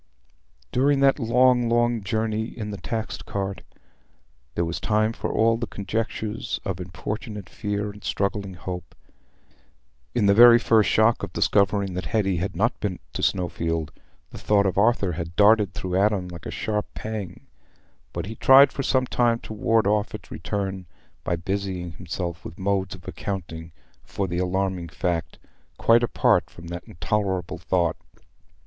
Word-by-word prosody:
During 140 +2 +3
that 135 +1 +4
long, 125 0 +3
long 120 -2 +2
journey 110 +1 -1
in 110 -2 -6
the 100 - -5
taxed 110 +2 -5
cart, 100 -1 -3 0.9
there 85 - +1
was 85 0 -3
time 110 +1 +1
for - - -3
all 115 +1 +3
the 120 0 -3
conjectures 110 +1 -3
of 95 -2 -3
importunate 105 +3 -6
fear 105 +1 -3
and 105 0 -14
struggling 100 -1 -2
hope. 90 -1 -7 1.2
In 115 -4 +2
the 100 - +6
very 120 +2 +9
first 110 -2 +3
shock 110 +2 +3
of 100 - -5
discovering 100 -1 +2
that 90 +1 -4
Hetty 95 -5 +1
had 90 +2 -3
not 110 +7 +1
been 95 -4 -2 0.2
to - - -4
Snowfield, 85 -3 -1 0.4
the - - -9
thought 100 -1 +3
of 95 - 0
Arthur 100 -2 +3
had 85 0 -5
darted 105 -1 +4
through 90 -1 -3
Adam 100 -2 +2
like 85 -1 -8
a - - -5
sharp 105 -1 -2
pang, 110 -5 -6 0.7
but - - -4
he 110 - -6
tried 135 +4 +7
for 140 - -3
some 130 -1 +2
time 120 -2 +2
to - - -8
ward 110 +1 +2
off 105 +1 +1
its - - -11
return 95 -3 -4 0.4
by 85 - 0
busying 95 0 -3
himself 85 0 -5
with 80 - -9
modes 95 0 -1
of 90 -1 -16
accounting 85 -5 -5 0.3
for 100 - -3
the 85 0 -2
alarming 90 -1 -1
fact, 85 +1 -2 0.4
quite 115 +1 +5
apart 120 - +2
from 85 0 -11
that 85 +1 -6
intolerable 95 -1 -2
thought. 85 -1 0
100 Hz, 160 wpm, -24 LUFS, 90-110 Hz, 1.2 s, very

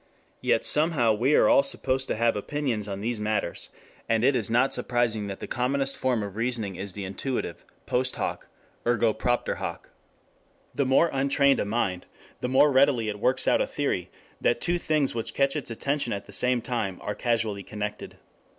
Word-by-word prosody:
Yet - - +2
somehow 150 -7 +4
we 125 +8 +2
are - - +5
all 285 0 +6
supposed 130 - 0
to - - -1
have 115 +1 +2
opinions 115 -1 -2
on 100 -1 -5
these 115 +1 -2
matters, 105 -4 -2 0.4
and 115 0 +2
it 135 +1 +4
is 115 -4 0
not 120 +4 +3
surprising 115 -4 0
that 100 -1 -7
the - - -4
commonest 135 +2 0
form 125 -4 0
of 100 -1 -7
reasoning 115 -4 -2
is 95 +1 -5
the 100 0 -5
intuitive, 125 +7 -4 0.2
post 130 +1 0
hoc - - -4 0.4
ergo 115 -2 +3
propter 120 +3 -1
hoc. - - -6 0.8
The 140 - 0
more 135 +6 +4
untrained 140 0 +3
a - - 0
mind, 100 -4 -2 0.3
the 125 - -2
more 140 +3 +5
readily 130 -4 +3
it 105 -1 -5
works 125 +4 +1
out - - +4
a - - 0
theory - - -2 0.3
that - - +2
two 175 0 0
things 155 -5 0
which 115 -1 -4
catch 140 +1 +2
its 150 - -4
attention 140 +2 -2
at 100 0 -5
the 100 - -13
same 125 +2 +2
time 110 -7 -2
are 105 - -3
causally 110 -4 -1
connected. 105 +1 -6
120 Hz, 185 wpm, -26 LUFS, 105-135 Hz, 0.8 s, all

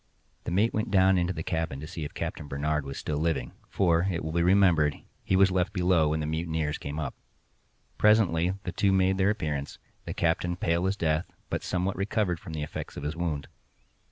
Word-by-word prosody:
The - - -3
mate 105 +6 +2
went 110 0 -1
down 95 -2 +4
into 90 +1 0
the 80 -3 -4
cabin 80 -5 -2
to 75 - -6
see 80 0 -6
if 75 - -7
Captain 75 - -4
Barnard 75 +1 -1
was 70 0 -6
still 75 -1 -2
living—for, 85 +4 0
it 85 -4 -2
will 80 - -3
be 85 +1 +1
remembered, 85 -5 +4 0.3
he 95 - +1
was 95 0 +5
left 90 +2 0
below 90 -4 +3
when 80 +1 0
the - - -2
mutineers 80 -1 -2
came 70 +2 -5
up. 70 -5 -3 0.9
Presently 95 -5 +4
the 90 - -3
two 100 +2 +2
made 95 0 +2
their 95 +1 +4
appearance, 75 -9 -2 0.3
the - - -5
captain 85 +1 +1
pale 85 +1 0
as 100 +2 -1
death, 80 0 0 0.2
but - - -1
somewhat 90 +1 -1
recovered 95 -3 0
from 85 -5 -9
the 75 -1 -3
effects 75 - -6
of - - -5
his 75 +2 -3
wound. 80 -4 -2
85 Hz, 205 wpm, -28 LUFS, 75-95 Hz, 0.9 s, was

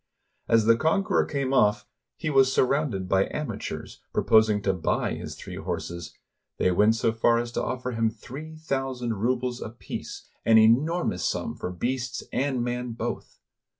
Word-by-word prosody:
As 115 -1 +4
the 115 +1 +6
conqueror 190 - +2
came 140 -3 -1
oflf, 105 -6 +3 0.3
he 155 - -2
was 135 -1 +5
surrounded 130 -8 +1
by 95 +1 +2
amateurs, 115 -9 -5
proposing 110 -2 +4
to 95 - +2
buy 90 - 0
his - - -6
three - - -8
horses; 85 -2 -5 0.4
they 90 - +2
went 105 +5 +4
so 115 0 +1
far 115 +1 +3
as 120 0 -2
to - - -2
offer 125 0 -3
him 115 -1 +1
three 140 +8 -9
thousand 135 -6 -2
rubles 125 +3 -1
apiece, 115 +2 -7 0.2
an 115 - +5
241 - - +9
RUSSIA 110 +3 +6
enormous 160 - -1
sum - - -1
for - - -4
beasts 125 +7 -3
and 130 -2 0
man 120 0 -3
both. 115 - -5
120 Hz, 165 wpm, -26 LUFS, 110-135 Hz, 0.4 s, 241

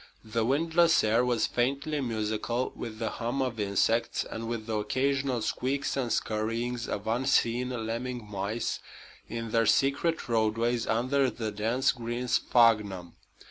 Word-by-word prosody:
The 110 +1 -1
windless 165 +6 +3
air 110 +3 +3
was 125 -2 +2
faintly 140 +4 -1
musical 115 +1 -2
with 110 -2 -6
the 110 -1 -2
hum 120 +4 -3
of 125 -4 -1
insects 105 +3 +1
and 115 0 -6
with 115 -2 -3
the 110 -1 -1
occasional 130 +2 0
squeaks 135 +2 -1
and 125 -4 -1
scurryings 115 +2 -1
of 100 - -4
unseen 120 +1 +1 0.2
lemming 120 +1 -4
mice 105 +3 -2 0.5
in 115 -1 -5
their 115 -1 +3
secret 140 +8 +2
roadways 115 +1 +1
under 130 +4 +2
the 110 -2 -4
dense 115 +6 +1
green 120 0 -4
sphagnum. 105 -8 +3
115 Hz, 140 wpm, -29 LUFS, 110-130 Hz, 0.5 s, windless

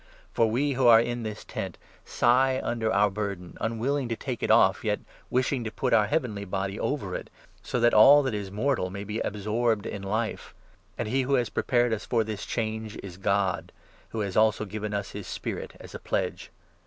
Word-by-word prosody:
For 115 -1 +3
we 140 +6 +1
who 130 -2 +2
are 115 -1 +9
in 120 +1 -1
this 110 -2 -6
' - - -36
tent - - -5 0.2
' - - -28
sigh 130 +2 +3
under 115 -2 -1
4 110 - +1
our 105 +1 +4
burden, 100 -3 -4
unwilling 120 +4 -1
to 115 - -1
take 125 0 -5
it - - -1
off, - - +5
yet - - 0 0.3
wishing 130 0 0
to 110 - -3
put 125 +3 -1
our 105 -2 +5
heavenly 110 -6 -1
body 95 +1 -3
over 100 -11 -2
it, - - -5 0.3
so 125 - -2
that 120 0 +4
all 140 +7 +8
that 130 -4 -1
is 100 -2 -3
mortal 105 -1 0
may 100 +2 -6
be 105 +2 -4
absorbed 110 +1 0
in 100 - -5
Life. 110 +3 -3 0.4
And - - -2
he 130 +5 +1
who 135 +2 +1
has 120 -3 +1
prepared 120 -3 +1
us 110 - -3
for 115 -2 +2
this 105 -2 -5
change 110 -2 -3
5 - - -8
is 90 -3 -8
God, 100 -1 0 0.4
who 110 - -3
has 100 -3 -3
also 110 0 +3
given 105 +1 -5
us 100 -1 -3
his - - -7
Spirit - - -5
as - - -11
a - - -6
pledge. - - -2
110 Hz, 215 wpm, -27 LUFS, 105-120 Hz, 0.4 s, are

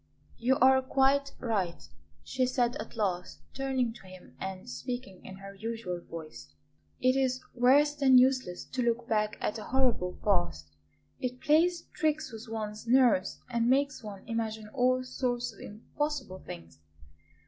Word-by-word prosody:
"You 255 +3 +3
are 265 +1 +5
quite 275 +1 +2
right," 190 - -2 0.4
she 255 -1 0
said 245 -1 +1
at - - -8
last, 185 -5 -2
turning 260 -3 0
to 195 - -14
him 185 -1 -14
and 190 +2 -6
speaking 245 -6 -6
in 190 - -9
her 195 +1 -10
usual 205 -4 -4
voice; 165 -2 -9 0.5
"it 255 +1 +3
is 260 -1 +1
worse 275 +4 +5
than 275 -3 +5
useless 255 -8 +3
to 255 - -3
look 235 0 0
back 215 -1 0
at 215 - -1
a 210 - -7
horrible 250 -9 +1
past. 80 - 0 0.4
It 250 0 -3
plays 335 +5 +3
tricks 310 -4 0
with 225 +1 -9
one's 215 0 -5
nerves 240 -6 +3
and 235 -1 +1
makes 280 0 +2
one 205 -2 -8
imagine 220 -2 -3
all 255 +1 +2
sorts 245 -2 -2
of 200 - -18
impossible 250 -1 -4
things. 85 - -10
240 Hz, 150 wpm, -30 LUFS, 200-260 Hz, 0.5 s, are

